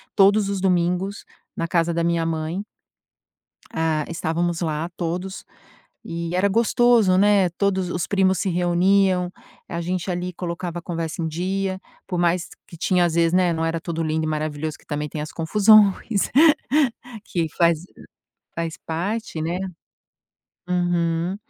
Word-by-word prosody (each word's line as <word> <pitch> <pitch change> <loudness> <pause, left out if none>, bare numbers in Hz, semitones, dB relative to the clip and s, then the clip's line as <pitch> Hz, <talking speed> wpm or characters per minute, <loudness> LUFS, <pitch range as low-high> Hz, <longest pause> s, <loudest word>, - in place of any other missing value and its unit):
todos 200 0 +5
os 200 -2 -2
domingos 180 +1 0 0.3
na 165 - -1
casa 170 0 +1
da 170 0 0
minha 170 -1 +1
mãe 165 +3 -2 1.1
hã, 160 -2 0
estávamos 170 +1 -1
lá, 160 -1 -2
todos, 180 +3 -4 0.6
e 170 0 -4
era 185 +2 +3
gostoso, 230 -2 +3
né, 200 -2 +4
todos 190 0 0
os - - -3
os 175 - -2
primos 190 -2 +2
se 195 - 0
reuniam, 180 +1 +2 0.4
a 170 -1 -3
gente, 180 +1 -3
ali, 180 0 -2
colocava 175 0 -4
a - - -12
conversa 165 -1 -4
em 160 - -1
dia, 190 +4 -2 0.3
por 180 - -3
mais 175 0 +1 0.2
que 170 - -12
tinha 180 +1 +2
às 170 - -1
vezes, 170 0 +3
né, 180 -1 +3
não 160 0 -1
era 165 0 -1
tudo 165 -1 -3
lindo 160 0 -1
e - - -1
maravilhoso, 155 0 -3
que - - -25
também 150 0 -3
tem 150 - -5
as 155 - -6
confusões 205 +4 +5 1.3
que 170 -2 -1
faz 170 -2 +4 0.8
faz 165 -1 -3
parte, 180 +2 -3
né. 170 +3 -2 1.1
Uhum. 175 0 0
175 Hz, 150 wpm, -23 LUFS, 165-190 Hz, 1.3 s, todos